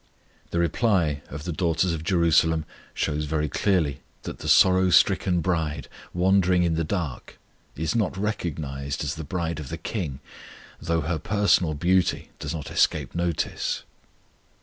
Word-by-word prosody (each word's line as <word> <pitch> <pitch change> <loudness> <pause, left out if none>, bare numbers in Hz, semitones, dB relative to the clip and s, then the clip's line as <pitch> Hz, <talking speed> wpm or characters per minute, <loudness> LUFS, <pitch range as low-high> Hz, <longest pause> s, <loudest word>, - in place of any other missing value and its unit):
The - - -3
reply 85 -4 +1
of 70 +2 -7
the 90 - -3
daughters 85 +1 +1
of 80 -1 -4
Jerusalem 80 -3 +3 0.3
shows 75 -1 -1
very 75 0 -1
clearly 80 -3 0 0.2
that - - -7
the - - -6
sorrow 95 0 +5
stricken 90 -1 +3
bride, 80 -4 -1 0.2
wandering 90 0 +3
in 85 -1 +1
the 80 +1 0
dark, 80 -5 -4 0.4
is 80 +1 -1
not 110 -5 0
recognized 75 -9 -3
as 75 0 -2
the 80 - -6
bride 85 0 -3
of 75 -4 -7
the - - -4
KING, 80 -11 -4 0.6
though 85 0 0
her 80 +2 -2
personal 100 -6 +2
beauty 90 +4 +1
does - - -4
not 80 -4 -5
escape - - +1
notice. 85 -2 -2
85 Hz, 150 wpm, -25 LUFS, 75-90 Hz, 0.6 s, sorrow